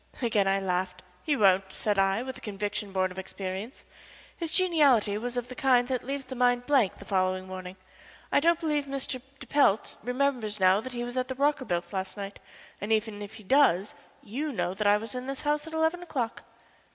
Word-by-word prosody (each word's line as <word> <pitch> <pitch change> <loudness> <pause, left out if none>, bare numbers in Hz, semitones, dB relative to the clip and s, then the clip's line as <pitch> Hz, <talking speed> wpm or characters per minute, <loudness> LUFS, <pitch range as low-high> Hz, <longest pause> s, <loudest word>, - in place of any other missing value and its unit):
Again 215 -5 +2
I 195 0 +3
laughed. 180 -1 -2 0.2
"He 300 - +1
won't," 190 -2 +4
said 205 0 +1
I, 195 +4 +2
with 260 0 -6
a - - -11
conviction 205 0 -3
born 185 -1 0
of 185 - -7
experience. 190 +5 -6 0.5
"His 335 -2 -3
geniality 290 - +4
was 245 +2 -4
of 245 0 -2
the 255 - -8
kind 250 -2 +3
that 255 -2 0
leaves 275 +1 -4
the - - -7
mind 245 -1 +2
a - - -23
blank 260 -9 +3
the - - -12
following 185 -1 0
morning. 185 0 -7 0.6
I - - +5
don't 335 +3 +3
believe 300 -3 0
Mr. 275 -2 -3 0.2
de - - -9
Pelt 275 -8 +2
remembers 250 -3 -1
now 190 +2 +5
that 260 +2 -7
he 240 0 -3
was 245 +1 -5
at 255 0 0
the 260 - -4
Rockerbilts' 255 -12 0
last 190 +1 -3
night, 200 0 -6 0.4
and 205 +2 -3
even 215 -1 0
if 205 +2 -8
he 220 - -11
does, 205 -4 +3 0.3
you 285 +8 -3
know 180 -6 -1
that 205 +2 -1
I 205 0 +6
was 220 +1 -5
in 250 0 -5
this 275 0 -4
house 295 +1 0
at 320 - -9
eleven 320 +2 +1
o'clock." 255 -10 -3
225 Hz, 210 wpm, -28 LUFS, 195-270 Hz, 0.6 s, I